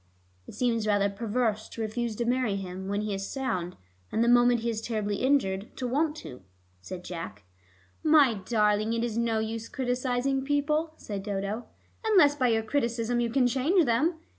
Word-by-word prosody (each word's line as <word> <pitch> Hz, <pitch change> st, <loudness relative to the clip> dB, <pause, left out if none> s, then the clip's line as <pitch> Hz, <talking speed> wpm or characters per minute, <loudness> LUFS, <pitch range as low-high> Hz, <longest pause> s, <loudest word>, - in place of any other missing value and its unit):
"It -, -, -10 dB
seems 230 Hz, -2 st, 0 dB
rather 200 Hz, -1 st, +2 dB
perverse 220 Hz, +1 st, -1 dB
to 230 Hz, -, -7 dB
refuse 225 Hz, +1 st, -2 dB
to 235 Hz, -, -2 dB
marry 245 Hz, -4 st, +1 dB
him 190 Hz, -1 st, -6 dB
when 200 Hz, +1 st, -1 dB
he 210 Hz, -1 st, -2 dB
is 195 Hz, 0 st, -4 dB
sound, 205 Hz, -10 st, -3 dB, 0.4 s
and 225 Hz, -, +2 dB
the -, -, +2 dB
moment 240 Hz, 0 st, +5 dB
he 235 Hz, -, -1 dB
is 220 Hz, -1 st, -4 dB
terribly 215 Hz, -3 st, -2 dB
injured 220 Hz, -8 st, 0 dB
to 255 Hz, -, -2 dB
want 300 Hz, +5 st, +1 dB
to," 125 Hz, -, -9 dB, 0.4 s
said 180 Hz, -, -7 dB
Jack. 165 Hz, -, -7 dB, 0.6 s
"My 300 Hz, -6 st, +6 dB
darling, 210 Hz, +1 st, +1 dB
it 230 Hz, 0 st, 0 dB
is 235 Hz, -2 st, -2 dB
no 230 Hz, -1 st, +1 dB
use 220 Hz, +1 st, -3 dB
criticizing 255 Hz, +1 st, -1 dB
people," 300 Hz, +3 st, 0 dB
said 200 Hz, -2 st, -5 dB
Dodo, 200 Hz, +3 st, -3 dB, 0.4 s
"unless 370 Hz, -10 st, +5 dB
by 260 Hz, -3 st, +2 dB
your 225 Hz, -1 st, +2 dB
criticism 235 Hz, -1 st, 0 dB
you 235 Hz, -1 st, +1 dB
can 255 Hz, +2 st, +2 dB
change 290 Hz, +8 st, +3 dB
them. 275 Hz, +9 st, +2 dB
230 Hz, 180 wpm, -28 LUFS, 210-255 Hz, 0.6 s, My